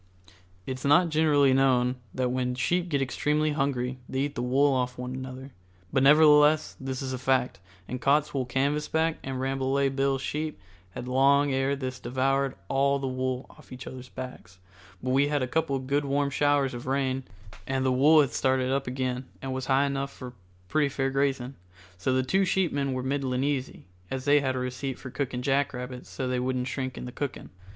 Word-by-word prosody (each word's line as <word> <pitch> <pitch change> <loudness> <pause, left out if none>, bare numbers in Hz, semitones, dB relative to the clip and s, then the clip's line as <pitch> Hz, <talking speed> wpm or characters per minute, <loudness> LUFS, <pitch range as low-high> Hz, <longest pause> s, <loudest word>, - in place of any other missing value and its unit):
It's 130 0 -5
not 165 +5 +5
generally 150 -3 +4
known 130 -2 +3 0.2
that 130 +2 -1
when 125 0 -1
sheep 175 +7 0
get 140 -4 +1
extremely 150 +3 0
hungry 135 -3 -1
they 130 - -1
eat 140 0 -1
the 120 - -3
wool 135 +3 +3
off 125 -1 -1
one 125 0 -5
another, 130 +1 -7 0.4
but 135 - +3
nevertheless 150 +1 +6
this 130 0 -4
is 130 -1 -3
a 130 - -4
fact, 130 0 +1 0.3
and 125 +1 -5
Cottswool 140 -2 +1
Canvasback 150 +4 0
and 130 -1 -4
Rambolet 135 +1 0
Bill's 135 -1 +1
sheep 155 -5 -3 0.4
had 125 - -6
long 140 +2 +3
ere 135 +1 +1
this 130 -2 -5
devoured 135 +2 0
all 140 +3 +2
the 135 - -4
wool 130 0 -2
off - - -19
each 125 +1 -8
other's 130 -1 -9
backs, 125 -8 -9 0.5
but 130 - -1
we 140 +2 +3
had 150 - -3
had 145 -3 +1
a - - -1
couple 145 -4 +1
good 140 +2 -1
warm 140 0 0
showers 145 -2 +2
of 120 +1 -7
rain 135 -1 0 0.5
and 135 0 0
the 130 - +3
wool 150 +5 +6
had 140 - -1
started 130 -1 +1
up 135 0 -1
again 130 0 -2
and 135 -1 -4
was 130 0 -4
high 135 +1 +3
enough 140 0 -2
for 125 -2 -9 0.3
pretty 150 +6 +2
fair 135 -1 -1
grazing, 135 -2 0 0.5
so 130 - 0
the 130 0 +2
two 190 +9 +2
sheepmen 150 -8 0
were 130 0 -3
middlin' 130 -1 -1
easy, 140 -2 -2 0.2
as 130 0 -4
they 145 0 +5
had 130 -2 -1
a - - -2
receipt 125 +1 -3
for 130 - -9
cooking 125 -2 -3
jackrabbits 130 -2 -1
so 130 - -4
they 125 0 0
wouldn't 125 0 -1
shrink 130 -1 -4
in - - -6
the 125 - -6
cooking. 140 +1 -5
135 Hz, 195 wpm, -27 LUFS, 130-140 Hz, 0.5 s, nevertheless